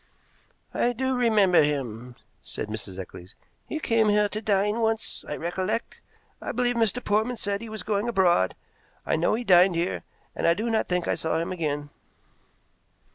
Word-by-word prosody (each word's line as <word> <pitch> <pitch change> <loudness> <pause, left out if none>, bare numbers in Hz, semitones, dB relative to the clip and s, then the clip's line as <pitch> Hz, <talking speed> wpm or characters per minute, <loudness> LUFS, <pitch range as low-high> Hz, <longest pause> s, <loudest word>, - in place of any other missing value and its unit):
"I 245 - +1
do 260 +2 -1
remember 215 -7 +4
him," 125 -5 -2 0.3
said 105 - -6
Mrs. 105 -3 -6
Eccles. 90 +1 -9 0.3
"He 310 - -2
came 225 -6 +2
here 210 0 +3
to 215 +2 -4
dine 210 +1 +1
once, 225 -1 -1
I - - -2
recollect. 185 +6 -3 0.4
I - - -3
believe 245 0 +1
Mr. 230 +1 +1
Portman 220 +4 +1
said 200 -1 -1
he 230 - -7
was 215 -3 -6
going 210 +3 0
abroad. 175 - +3 0.5
I - - +1
know 165 +6 +2
he 240 - -3
dined 180 -3 +6
here, 170 +2 -1 0.3
and - - 0
I 170 - +5
do 230 +4 -2
not 220 - +1
think 180 -1 -1
I - - +2
saw 160 - -1
him 165 +2 -2
again." 145 -4 -3
200 Hz, 175 wpm, -26 LUFS, 165-225 Hz, 0.5 s, dined